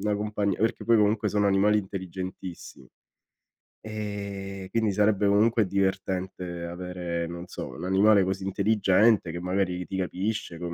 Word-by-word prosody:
una 105 0 0
compagnia, 105 -2 -1
perché 110 +1 0
poi 115 0 +5
comunque 105 0 +2
sono 105 0 +1
animali 100 +2 +4
intelligentissimi. 95 -7 -6 0.9
Ehm, 100 -3 -6
quindi 110 0 +1
sarebbe 105 0 +3
comunque 110 +2 +3
divertente 95 -2 -2
avere 85 -1 -4
non 85 +1 -7
so, - - -6
un - - -9
animale 100 +2 +4
così 95 +1 -2
intelligente 100 0 +3
che 85 +1 -5
magari 90 -1 -1
ti 95 - -5
capisce 95 0 -3
con 85 0 -5
95 Hz, 140 wpm, -27 LUFS, 90-105 Hz, 0.9 s, poi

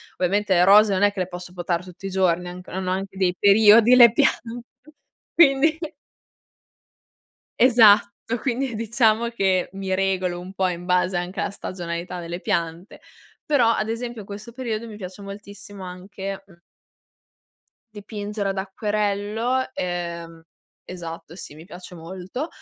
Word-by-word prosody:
ovviamente 195 +2 +1
le 175 -1 +4
rose, 205 +2 +6
non 185 - 0
è 205 - +5
che 200 - -8
le 180 - -1
posso 180 -1 -9
potare 175 -1 -2
tutti 185 +1 -12
i 195 - -2
giorni 180 -2 +1
han 175 - -7
anc 180 0 -12
hanno 185 0 -3
anche 195 +1 -4
dei 180 -2 +1
periodi 215 +4 +6
le 235 -3 +8
piante 235 0 0 0.7
quindi 310 0 +4 1.8
Esatto 225 -5 +6 0.3
quindi 255 -1 -2
diciamo 230 +1 +1
che 190 -5 0
mi 195 -1 -3
regolo 185 -2 0
un 185 +2 -10
po' 190 -1 0
in 175 0 -6
base 180 0 +1
anche 175 +2 -4
alla - - -1
stagionalità 180 -2 -6
delle 170 +1 -6
piante, 170 -2 -3 0.4
però, 260 -6 +3
ad 215 -1 -1
esempio, 235 0 -4
in 200 - -13
questo 210 +3 -9
periodo 235 -3 -4
mi 215 - -9
piace 185 0 -9
moltissimo 200 0 -10
anche, 190 +2 -7
mhmm 170 -2 -21 1.3
dipingere 205 -1 -5
ad 195 - -3
acquerello 210 +5 -1
ehm, 170 -2 -5 0.4
esatto 170 -2 -8
sì, 150 - -10
mi 160 +2 -13
piace 180 -1 -11
molto. 185 - -6
195 Hz, 150 wpm, -23 LUFS, 180-215 Hz, 1.8 s, le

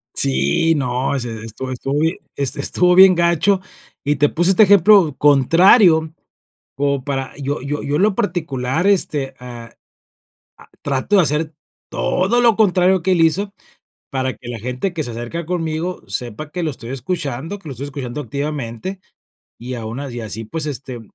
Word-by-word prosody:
Sí, 70 - +2
no, 135 0 -1
sí, 120 -1 -4 0.2
estu 120 +4 -7
estuvo 135 +3 -3
bien, 160 +3 +1 0.2
este 140 0 -2
estuvo 180 +5 +2
bien 190 0 +8
gacho, 170 +3 +2 0.4
y 145 0 +1
te 145 +1 +3
puse 175 +3 +1
este 205 +3 +6
ejemplo 195 -5 +5
contrario, 160 - +5 0.6
como 140 -1 -1
para 135 -2 -4
yo 140 0 -3
yo 145 +2 -4
yo 145 0 -1
en 160 - +1
lo 210 -1 +3
particular, 160 - -1
este, 150 -8 0
ah, 120 -2 -10 0.9
ah, - - -18
trato 140 +9 0
de - - +6
hacer 155 0 -1 0.4
todo 195 +7 0
lo 230 -3 +4
contrario 185 -3 +3
que 185 +3 0
él 175 - +3
hizo, 195 +5 +1 0.6
para 130 -1 -2
que 120 - -12
la 120 - -5
gente 125 - -3
que 160 - -2
se 120 - -6
acerca 120 +9 -5
conmigo 165 +1 -3
sepa 120 +8 -5
que 180 +2 -4
lo 160 - -1
estoy 125 -3 -8
escuchando, 145 +4 -4
que 170 -6 -12
lo - - -5
estoy 130 +3 -7
escuchando 140 0 -5
activamente, 140 - -4 0.6
y 125 +2 -6
a 115 - -6
unas 130 +3 -6
y 120 - -4
así 110 +1 -5
pues, 155 +8 -4
este, 130 -3 -6
145 Hz, 175 wpm, -19 LUFS, 130-175 Hz, 0.9 s, bien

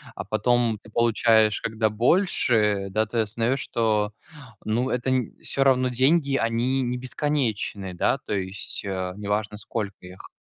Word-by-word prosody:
а - - -5
потом 115 +1 +1
ты - - -16
получаешь 110 -1 +3
когда 110 -1 0
больше, 110 - +2
да, 110 +3 +1
ты 115 +2 -3
осознаешь, 115 +4 0
что, 110 -4 0 0.5
ну, 120 +4 0
это 125 +1 -1
не 125 -4 -1
все 135 - 0
равно 130 -1 +3
деньги 140 +3 +2
они 120 +3 0
не 125 0 -2
бесконечные, 125 -8 -2
да, 90 +9 +1
то 135 - -6
есть, 95 0 -4
э, 95 -2 -3
неважно 105 0 -2
сколько 105 -2 -5
их. 90 +1 -12
115 Hz, 150 wpm, -24 LUFS, 105-125 Hz, 0.5 s, получаешь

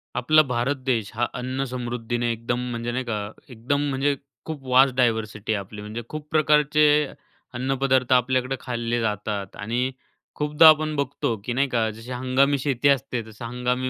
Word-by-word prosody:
आपला 155 +6 +5
भारत 125 +4 0
देश 115 -5 0
हा 120 - 0
अन्न 130 +2 -3
समृद्धीने 120 -1 -2
एकदम 115 +2 -2
म्हणजे 120 0 -3
नाही 130 +2 -2
का, 105 -3 -3 0.2
एकदम 125 +4 -1
म्हणजे 140 +1 +1 0.3
खूप 155 -4 -6
वास्ट 130 +1 +5
डायव्हर्सिटी 110 -3 0
आहे 105 - 0
आपली. 100 +2 -9
म्हणजे 105 +3 -6
खूप 155 -1 -7
प्रकारचे 150 -1 +4 0.7
अन्नपदार्थ 130 0 +1
आपल्याकडं 130 +1 +2
खाल्ले 120 -1 -2
जातात 105 -2 -3
आणि 120 +5 -2 0.4
खूपदा 150 +2 +5
आपण 155 0 +3
बघतो, 140 -4 -1
की 120 - -2
नाही 140 +3 +2
का, 115 -3 +1
जशी 115 +4 -10
हंगामी 130 +3 +2
शेती 135 0 0
असते. 125 -3 +1
तसं 110 +2 -9
हंगामी 125 +2 -1
125 Hz, 160 wpm, -24 LUFS, 115-135 Hz, 0.7 s, आपला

